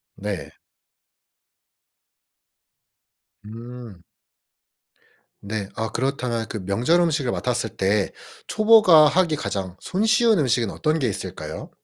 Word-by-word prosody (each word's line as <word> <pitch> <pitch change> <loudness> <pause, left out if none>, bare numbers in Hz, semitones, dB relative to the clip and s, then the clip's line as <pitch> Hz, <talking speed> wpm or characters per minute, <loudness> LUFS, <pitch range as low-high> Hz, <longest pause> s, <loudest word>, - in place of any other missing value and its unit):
네. 100 -1 -5 3.0
음. 115 -4 -10 1.4
네. 100 -1 -5
아 110 -1 -3
그렇다면 125 -2 -2
그 105 -4 -5
명절 120 - +2
음식을 155 -7 +1
맡았을 120 -3 -2
때 100 +1 +1 0.4
초보가 210 -8 +6
하기 165 -1 +2
가장 100 -7 -4
손쉬운 220 +2 +2
음식은 120 -6 +1
어떤 155 0 -1
게 135 - 0
있을까요? 100 - -6
120 Hz, 195 characters per minute, -23 LUFS, 105-160 Hz, 3.0 s, 초보가